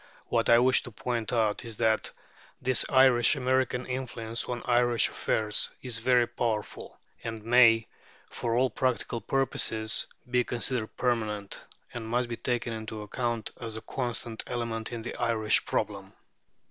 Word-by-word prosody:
What 115 -1 +1
I 115 - +8
wish 125 +2 +4
to 120 - -10
point 115 -1 -3
out 110 -2 +1
is 115 -3 -6
that 110 -1 +1 0.5
this 130 -1 +3
Irish 130 -1 +5
American 130 -1 0
influence 120 -3 -3
on 120 -1 -4
Irish 120 -1 +3
affairs 105 -1 +1
is 120 -3 -1
very 125 0 +4
powerful, 115 -3 -4 0.2
and 115 -2 -5
may, 115 -1 +5 0.4
for 115 -1 -2
all 130 +1 +2
practical 125 -2 -1
purposes, 110 -3 +1 0.2
be 125 0 +2
considered 120 -2 -1
permanent, 110 -5 -1 0.3
and 115 -2 -5
must 120 +1 0
be 120 - -2
taken 120 -1 -2
into 110 -1 -6
account 120 +1 -3
as 115 -2 -5
a - - -6
constant 120 -3 -3
element 115 -2 -3
in 115 -2 -5
the 120 - -5
Irish 115 -3 +2
problem. - - -2
120 Hz, 145 wpm, -28 LUFS, 110-125 Hz, 0.5 s, I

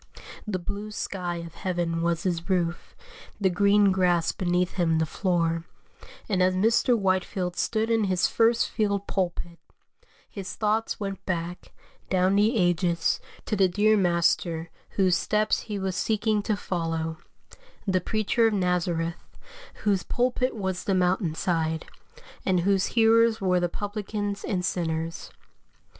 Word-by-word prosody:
The 200 -3 -1
blue 200 +4 -5
sky 180 -4 -4
of 165 - -11
heaven 175 -2 -2
was 170 -1 0
his 175 -1 -2
roof, 175 -2 -1 0.4
the 190 -3 +2
green 200 +2 +4
grass 180 -3 +2
beneath 180 0 0
him 165 -3 +1
the 160 - +2
floor; 165 -1 0 0.6
and 190 -4 +1
as 185 0 +3
Mr. 230 +5 +3
Whitefield 185 -2 -1
stood 220 +3 0
in 225 -2 +3
his 185 -2 +1
FIRST 230 0 +2
FIELD 200 -3 0
PULPIT, 175 -2 -3 0.7
his 195 -2 -7
thoughts 220 +1 0
went 195 -2 -5
back, 175 0 -4 0.4
down 185 +1 +2
the 215 +4 +3
ages, 175 -2 +1 0.3
to 215 - -1
the 195 -2 +4
dear 210 +4 +3
Master 170 -3 +1 0.3
whose 185 -3 +4
steps 215 +3 +1
he 210 -2 -5
was 190 -2 -2
seeking 215 +1 +1
to 210 0 -1
follow 165 -3 -3 0.7
the 185 -2 +1
Preacher 215 +4 +1
of 220 - 0
Nazareth, 175 -3 -1 0.5
whose 200 -3 +2
pulpit 250 +4 0
was 190 -3 -3
the 195 - +1
mountain 180 -2 +1
side, 160 -2 -1 0.6
and 185 -2 +2
whose 195 +1 +2
hearers 230 0 +5
were 185 -3 +2
the 175 0 0
publicans 205 0 -4
and 180 -3 -1
sinners. 165 -1 -2
185 Hz, 140 wpm, -26 LUFS, 175-205 Hz, 0.7 s, hearers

